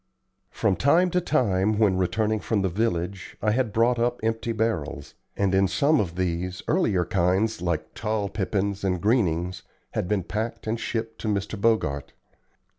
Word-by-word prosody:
From 95 - 0
time 170 +6 +4
to 180 - +2
time 105 - +1
when 105 -4 +3
returning 110 +4 +1
from 105 -2 0
the 95 - +1
village 95 -1 -2
I 105 - +1
had 120 0 +1
brought 115 +3 +2
up 120 +1 0
empty 115 +1 -1
barrels; 80 -11 -2 0.2
and 100 -2 +1
in 95 0 +4
some 140 +10 +3
of 85 -4 -2
these, 90 0 -2
earlier 105 - +2
kinds, 95 +3 +1
like 85 -3 -2
tall 105 -2 -1
pippins 100 0 -2
and 90 -2 0
greenings, 90 -5 +1 0.3
had - - -2
been 100 -1 0
packed 110 +6 -4
and 110 +1 -1
shipped 115 -1 -4
to - - -3
Mr. 100 0 -1
Bogart. 80 - +1
105 Hz, 165 wpm, -25 LUFS, 90-115 Hz, 0.3 s, time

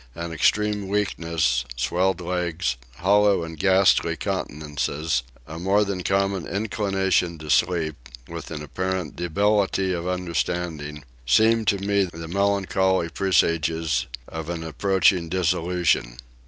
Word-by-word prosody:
An 85 +1 -5
extreme 105 +4 +1
weakness, 85 -10 0
swelled 90 +9 0
legs, 90 -4 -1 0.2
hollow 100 +3 +3
and 80 0 -7
ghastly 95 +1 +4
countenances, 75 -1 -2 0.2
a 80 +4 -8
more 100 +4 +2
than 100 -2 -3
common 95 -1 0
inclination 95 -4 0
to 75 -1 -5
sleep, 80 -7 0 0.2
with 85 -1 -7
an 75 -2 -6
apparent 95 0 -3
debility 95 +2 +1
of 85 0 -3
understanding, 85 -4 -3 0.2
seemed 110 - +4
to 100 - +3
me 100 0 +1
the 80 -2 -8
melancholy 95 -1 +1
presages 80 -4 +1 0.2
of 80 0 -6
an 85 -1 -4
approaching 90 +1 +2
dissolution. 85 -8 0
90 Hz, 115 wpm, -24 LUFS, 80-95 Hz, 0.2 s, ghastly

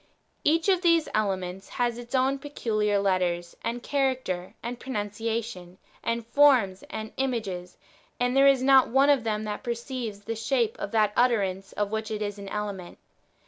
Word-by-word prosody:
Each 325 +3 +2
of 375 -2 +3
these 335 -3 +4
elements 190 -3 -2
has 240 -1 -1
its 240 +2 -5
own 265 +1 +2
peculiar 215 -7 0
letters, 180 -3 0
and 240 +1 -3
character, 260 -10 -1
and 240 +1 -5
pronunciation, 210 -5 -4 0.3
and 230 0 -1
forms, 235 -8 +4
and 220 0 -5
images, 205 -9 -3 0.4
and 245 +1 +1
there 275 0 +6
is 270 -2 +4
not 265 -1 +6
one 270 +4 +5
of 275 -5 +2
them 215 -1 -1
that 210 -1 -4
perceives 235 -3 -4
the 225 +2 -4
shape 230 0 0
of - - -3
that 215 -1 +2
[utterance] 195 -6 +1
of 205 0 -2
which 220 0 -2
it 215 -1 -2
is 205 0 -4
an 200 -1 -7
element. 200 -4 -5
225 Hz, 165 wpm, -27 LUFS, 200-260 Hz, 0.4 s, there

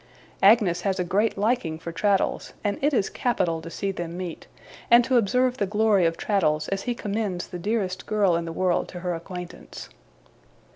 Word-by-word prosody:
Agnes 195 -4 +5
has 195 -2 -1
a - - +2
great 205 +5 0
liking 205 -7 0
for 170 +1 -7
Traddles, 195 +3 0
and 205 -1 -1
it 290 +2 +3
is 220 -8 +1
capital 180 -9 -1
to 165 - -8
see 195 +3 -3
them 175 -2 -5
meet, 180 -3 -6 0.4
and 240 +1 +7
to 260 - +1
observe 250 +3 +2
the 200 - 0
glory 210 -3 +3
of 165 - -2
Traddles 155 -7 +1
as 195 0 -2
he 245 +3 -2
commends 205 -4 -3
the 180 - -8
dearest 190 -1 -2
girl 205 -5 +2
in 170 0 -1
the 165 - -5
world 180 +1 0
to 180 - -8
her 180 -1 -2
acquaintance. 180 +1 -8
195 Hz, 190 wpm, -25 LUFS, 175-215 Hz, 0.4 s, and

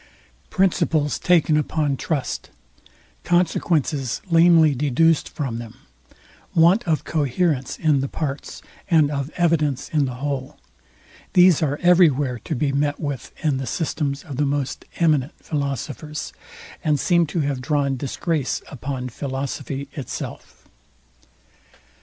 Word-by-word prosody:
Principles 165 -6 +1
taken 165 -3 +3
upon 150 -2 0
trust, 145 0 -3 0.7
consequences 155 -6 +1
lamely 165 -2 +6
deduced 150 +4 +2
from 125 -6 -4
them, 115 -2 -9 0.8
want 175 +8 +5
of 160 -2 +1
coherence 145 -2 0
in 155 -4 +2
the 135 - -1
parts, 140 -1 -5 0.3
and 155 -4 +4
of 140 -1 -2
evidence 155 -6 +1
in 150 -3 +2
the 130 -2 -4
whole, 135 0 -4 0.8
these 180 -3 +6
are 145 -2 0
every 180 -1 +7
where 130 -3 -2
to 155 - -4
be 140 +2 0
met 145 +1 0
with 145 -5 -4
in 145 -3 +2
the 130 -1 -4
systems 145 -4 -2
of 140 -5 -8
the 150 - +2
most 140 -2 -2
eminent 155 -4 +2
philosophers, 145 +1 -4 0.5
and 150 -3 +2
seem 170 0 +3
to 160 +2 -1
have 140 -3 -2
drawn 140 -1 0
disgrace 140 +2 -2
upon 130 -1 -4
philosophy 135 +1 -4
itself. 140 - -7
145 Hz, 125 wpm, -22 LUFS, 135-160 Hz, 0.8 s, every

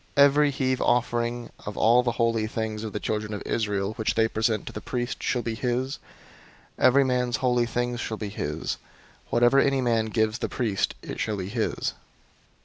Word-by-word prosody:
005:009 140 - +9
Every 145 +1 +5
heave 130 -2 0
offering 120 0 0
of 105 - -6
all 120 +3 +5
the 120 -1 -1
holy 115 -2 +1
things 110 -1 -3
of 110 - -4
the 105 - -3
children 105 0 -2
of 100 - -6
Israel, 105 -2 -1
which 110 - 0
they 110 0 +4
present 110 -1 0
to - - -7
the - - -6
priest, 120 0 -3
shall 120 -2 0
be 115 - -2
his. 125 +4 -2 0.8
005:010 - - +3
Every 135 +2 +6
man's 125 -2 +1
holy 125 -2 +2
things 120 0 -2
shall 110 -2 -3
be 105 -1 -4
his: 75 -6 -3 0.5
whatever 120 +3 +4
any 135 -1 +3
man 115 -3 +1
gives 110 +1 0
the - - -2
priest, 110 -6 -1
it - - -6
shall 110 -2 -1
be 95 0 -4
his." 115 +1 -1
120 Hz, 195 wpm, -26 LUFS, 110-125 Hz, 0.8 s, 005:009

